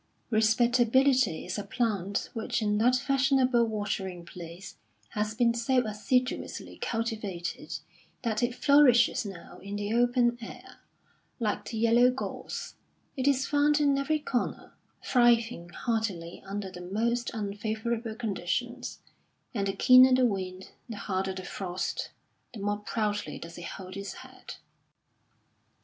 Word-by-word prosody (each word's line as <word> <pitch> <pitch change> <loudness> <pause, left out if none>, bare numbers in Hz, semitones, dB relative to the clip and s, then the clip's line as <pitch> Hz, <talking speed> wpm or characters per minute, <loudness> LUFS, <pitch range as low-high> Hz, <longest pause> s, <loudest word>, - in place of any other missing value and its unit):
Respectability 240 - +3
is 185 +3 -3
a - - -3
plant 205 -4 -1
which 235 +1 -2
in 210 0 +1
that 245 +3 +4
fashionable 260 -2 +3
watering 195 -5 -3
place 170 +2 -10 0.3
has 210 0 -2
been 235 0 +3
so 245 +1 +1
assiduously 250 +4 -1
cultivated 215 -7 -3 0.5
that 220 -3 0
it 240 0 0
flourishes 255 -7 +5
now 180 -4 -10
in 200 +1 -6
the 205 +1 -2
open 240 0 +3
air; 230 - -10 0.6
like 215 -3 -1
the 225 - -4
yellow 235 +2 +5
gorse, 470 - -5 0.4
it 260 0 -1
is 270 -2 +3
found 295 +1 +3
in 285 -2 +3
every 275 +3 +1
corner, 270 -5 -3 0.3
thriving 235 -7 +3
hardily 195 -5 -3
under 195 -1 -4
the 180 -1 -9
most 230 +6 -1
unfavourable 220 +2 -3
conditions; 235 +3 -3 0.5
and 200 -4 -1
the 195 - 0
keener 255 +5 +7
the 255 0 +4
wind, 190 -4 -3 0.2
the 225 - -5
harder 190 -1 -2
the 185 - -6
frost, 180 -1 -3 0.5
the - - -7
more 205 +1 -1
proudly 210 0 -2
does 170 0 -9
it 175 - -8
hold 185 0 -8
its 200 0 -5
head. - - -11
225 Hz, 130 wpm, -29 LUFS, 200-245 Hz, 0.6 s, keener